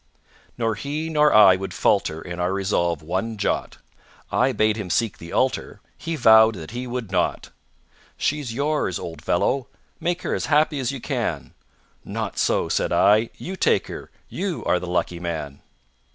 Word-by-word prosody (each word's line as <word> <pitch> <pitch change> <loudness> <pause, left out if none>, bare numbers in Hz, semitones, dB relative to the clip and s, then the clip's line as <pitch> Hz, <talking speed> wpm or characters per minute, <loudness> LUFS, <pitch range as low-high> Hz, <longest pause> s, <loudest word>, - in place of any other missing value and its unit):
Nor 115 -2 0
he 150 +9 -4
nor 150 -1 +4
I 105 -3 +8
would 95 +1 -6
falter 80 +1 +1
In 90 0 -7
our 90 +1 0
resolve 85 -5 0
one 95 +7 -2
jot. 100 - -2 0.5
I 135 - +2
bade 110 -2 +2
him 105 -4 -5
seek 110 +2 0
the 85 - -10
altar, 130 0 -1 0.2
He 165 +1 -4
vowed 110 -4 +6
that 80 -1 -8
he 125 +2 -5
would 120 -5 -5
not. - - -1 0.7
"She's 145 -5 -1
yours, 140 - -1
old 80 -3 -7
fellow. 125 +10 +1 0.3
Make 175 +1 -2
her - - -1
As - - -2
happy 150 0 +2
as 130 -1 -1
you 135 -3 -7
can." - - -3 0.5
"Not - - -4
so," - - +1
said - - 0
I, 110 +3 +4
"you 190 - -6
take - - +2
her - - -8 0.2
You 190 -4 -4
are 90 - +2
the 90 - -7
lucky 90 0 -1
man." 80 -5 -5
110 Hz, 170 wpm, -23 LUFS, 90-140 Hz, 0.7 s, I